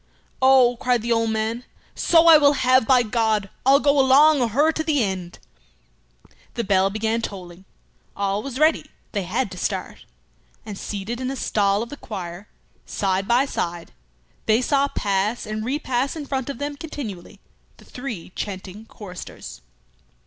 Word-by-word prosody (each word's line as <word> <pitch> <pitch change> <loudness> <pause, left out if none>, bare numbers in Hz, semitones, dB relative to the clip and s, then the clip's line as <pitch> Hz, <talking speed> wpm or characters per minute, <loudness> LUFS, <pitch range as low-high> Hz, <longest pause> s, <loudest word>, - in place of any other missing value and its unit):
"Oh," 260 -2 +5
cried 245 -2 0
the 235 - -2
old 230 -1 +2
man, 220 +2 -2 0.3
"so 330 -1 +4
I 330 -1 +9
will 285 -1 +5
have, 255 -3 +3
by 255 -2 +5
God! 215 -3 0 0.2
I'll 275 +1 +6
go 285 0 +3
along 280 +2 +5
o' 240 - +2
her 290 +8 +2
to 315 - -3
the 300 -6 +1
end!" 185 -3 -4 1.2
The 235 - -1
bell 195 -2 +2
began 220 +2 -1
tolling. 185 -3 -8 0.5
All 200 +1 -1
was 260 0 -6
ready; 310 +2 +2 0.2
they 205 - -2
had 195 +4 -2
to 180 - -8
start. - - -4 0.6
And 210 -2 -6
seated 210 +5 -5
in 255 - -2
a 270 - -3
stall 205 -4 +1
of 235 - -9
the 290 - -8
choir, 185 -4 -7 0.4
side 195 -1 -1
by 245 +4 +3
side, 170 -10 -4 0.6
they 220 +1 +4
saw 275 +2 +2
pass 205 -1 -1
and 215 0 -4
repass 260 +1 -1
in 305 -3 -6
front 265 -1 -3
of 280 - -5
them 285 +1 -4
continually 260 - -8 0.4
the - - -18
three 240 -10 -7
chanting 200 +2 -7
choristers. 180 - -10
230 Hz, 165 wpm, -22 LUFS, 200-270 Hz, 1.2 s, I